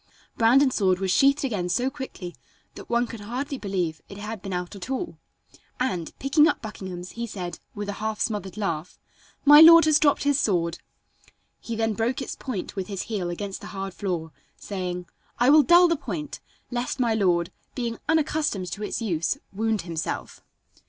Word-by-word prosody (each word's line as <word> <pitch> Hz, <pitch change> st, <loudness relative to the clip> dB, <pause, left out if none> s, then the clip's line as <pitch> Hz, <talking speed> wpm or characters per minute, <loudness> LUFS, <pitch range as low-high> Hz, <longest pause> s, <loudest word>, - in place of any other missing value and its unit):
Brandon's 255 Hz, +4 st, +4 dB
sword 185 Hz, -3 st, +2 dB
was 190 Hz, 0 st, -1 dB
sheathed 275 Hz, +7 st, +4 dB
again 195 Hz, -8 st, -2 dB
so 245 Hz, +8 st, +1 dB
quickly 260 Hz, -11 st, -7 dB, 0.4 s
that -, -, -11 dB
one 235 Hz, +1 st, +2 dB
could 230 Hz, -1 st, -8 dB
hardly 255 Hz, +7 st, -4 dB
believe 180 Hz, -6 st, -2 dB
it 195 Hz, -, -9 dB
had 210 Hz, 0 st, -6 dB
been 195 Hz, -, -6 dB
out 180 Hz, +2 st, -4 dB
at 195 Hz, +4 st, -8 dB
all, 270 Hz, +6 st, -3 dB, 0.6 s
and, 185 Hz, -11 st, -2 dB
picking 295 Hz, +3 st, +4 dB
up -, -, 0 dB
Buckingham's, 185 Hz, -4 st, -7 dB
he 235 Hz, 0 st, -5 dB
said 180 Hz, -6 st, -6 dB, 0.2 s
with 205 Hz, 0 st, -4 dB
a 205 Hz, -, -2 dB
half 220 Hz, -1 st, -2 dB
smothered 205 Hz, -3 st, -2 dB
laugh: 175 Hz, -5 st, -3 dB, 0.5 s
"My 295 Hz, +1 st, +10 dB
lord 330 Hz, 0 st, +10 dB
has 310 Hz, -1 st, +5 dB
dropped 290 Hz, -2 st, +3 dB
his 285 Hz, -1 st, +2 dB
sword." 170 Hz, -7 st, 0 dB, 0.8 s
He 230 Hz, -, -5 dB
then 225 Hz, 0 st, 0 dB
broke 230 Hz, +4 st, -1 dB
its 265 Hz, -, -5 dB
point 245 Hz, -9 st, -5 dB
with 190 Hz, -2 st, -3 dB
his 195 Hz, -3 st, -4 dB
heel 195 Hz, -6 st, -3 dB
against 195 Hz, +3 st, -5 dB
the -, -, -8 dB
hard 195 Hz, -1 st, -4 dB
floor, 175 Hz, -6 st, -3 dB, 0.3 s
saying: 180 Hz, -3 st, -4 dB, 0.3 s
"I 245 Hz, +3 st, +5 dB
will 305 Hz, +1 st, +8 dB
dull 345 Hz, +5 st, +6 dB
the 335 Hz, -, +2 dB
point, 300 Hz, 0 st, -5 dB, 0.3 s
lest 245 Hz, +2 st, -2 dB
my 235 Hz, -3 st, +2 dB
lord, 175 Hz, -5 st, +1 dB, 0.2 s
being 235 Hz, -3 st, -3 dB
unaccustomed 300 Hz, -, 0 dB
to 210 Hz, -, -5 dB
its 220 Hz, -, -3 dB
use, 170 Hz, -, 0 dB, 0.2 s
wound 220 Hz, 0 st, 0 dB
himself." 165 Hz, -2 st, -5 dB
215 Hz, 180 wpm, -25 LUFS, 185-260 Hz, 0.8 s, My